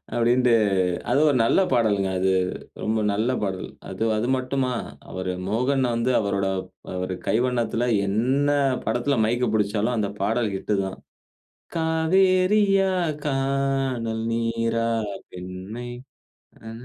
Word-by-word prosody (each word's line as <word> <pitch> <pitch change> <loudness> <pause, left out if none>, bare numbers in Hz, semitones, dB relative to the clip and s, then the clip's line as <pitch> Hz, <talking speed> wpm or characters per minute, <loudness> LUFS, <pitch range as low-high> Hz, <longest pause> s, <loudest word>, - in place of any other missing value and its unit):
அப்டின்ட்டு, 120 +1 +3 0.6
அது 125 +3 +3
ஒரு 140 - +2
நல்ல 115 - +3
பாடல்ங்க. 105 -6 +2
அது, 95 +1 +2 0.5
ரொம்ப 110 +1 0
நல்ல 110 +4 0
பாடல். 95 -2 -3 0.2
அது, - - -3
அது 110 +3 -1
மட்டுமா 130 0 -1 0.4
அவரு 95 0 -3 0.2
மோகன் 130 +5 +1
வந்து 115 +2 0
அவரோட 100 -2 0 0.2
ப் - - -17
அவரு 90 0 -3
கைவண்ணத்தில 120 0 +1 0.2
என்ன 130 +8 +1 0.4
படத்தில 120 +4 0
மைக் 120 +3 +1
புடிச்சாலும் 105 +3 +1
அந்த 105 -2 0
பாடல் 110 -1 +1
ஹிட்டு 105 +2 -1
தான். 95 - -6 0.8
"காவேரியா 185 +4 +3 0.3
காணல் 135 -4 -1
நீரா 115 0 0 0.4
பெண்மை 95 +6 -7 0.8
ஹ்ம், 110 +1 -8
115 Hz, 115 wpm, -24 LUFS, 110-135 Hz, 0.8 s, அப்டின்ட்டு